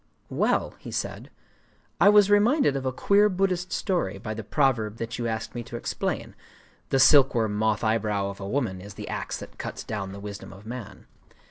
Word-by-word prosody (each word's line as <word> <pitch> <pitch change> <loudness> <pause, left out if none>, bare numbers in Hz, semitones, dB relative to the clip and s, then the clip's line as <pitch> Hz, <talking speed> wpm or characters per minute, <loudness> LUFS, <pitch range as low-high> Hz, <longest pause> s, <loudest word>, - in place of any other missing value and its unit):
"Well," - - +1
he - - -9
said, - - -4 0.7
"I 205 - +7
was 205 -1 +6
reminded 225 - +4
of 135 -1 -2
a - - +1
queer 200 +10 +3
Buddhist 185 -1 0
story 175 - -1
by 110 +2 -5
the 110 0 -6
proverb 115 -4 +1
that 115 +1 -5
you 120 - -1
asked 110 0 -3
me 120 - -4
to 120 - -8
explain,—_The 115 - -4
silkworm 130 -5 +5
moth 110 0 +1
eyebrow 105 -3 0
of 100 - -12
a 100 0 -5
woman 110 -8 -1
is 100 +1 -10
the - - -7
axe - - -3
that - - -11
cuts - - -5
down 100 -3 -4
the 100 - -8
wisdom 100 0 -8
of 100 +2 -14
man. 115 -2 -8
115 Hz, 190 wpm, -26 LUFS, 105-145 Hz, 0.7 s, I